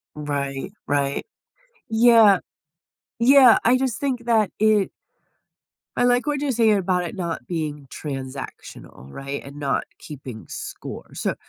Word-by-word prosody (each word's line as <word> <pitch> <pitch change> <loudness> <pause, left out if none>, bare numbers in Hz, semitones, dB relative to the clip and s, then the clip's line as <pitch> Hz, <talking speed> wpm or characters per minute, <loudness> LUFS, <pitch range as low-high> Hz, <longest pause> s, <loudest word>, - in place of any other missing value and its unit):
Right, 140 +1 -4 0.2
right. 140 -1 0 0.6
Yeah 225 -3 +6 0.8
Yeah, 255 -1 +7
I 245 +3 +4
just 255 -3 -2
think 255 -4 -2
that 220 -4 +3
it 215 -2 +3 1.1
I 245 - +2
like 245 +2 +3
what 295 -2 -1
you're 285 -2 0
saying 220 -3 +3
about 180 -1 0
it 170 - -6
not 170 -3 -4
being 150 -5 -4
transactional, 130 - -8
right, 140 +1 -6
and 140 +1 -11
not 140 -1 0 0.2
keeping 130 -7 -9
score. - - -8
So, - - -2
185 Hz, 130 wpm, -23 LUFS, 140-235 Hz, 1.1 s, Yeah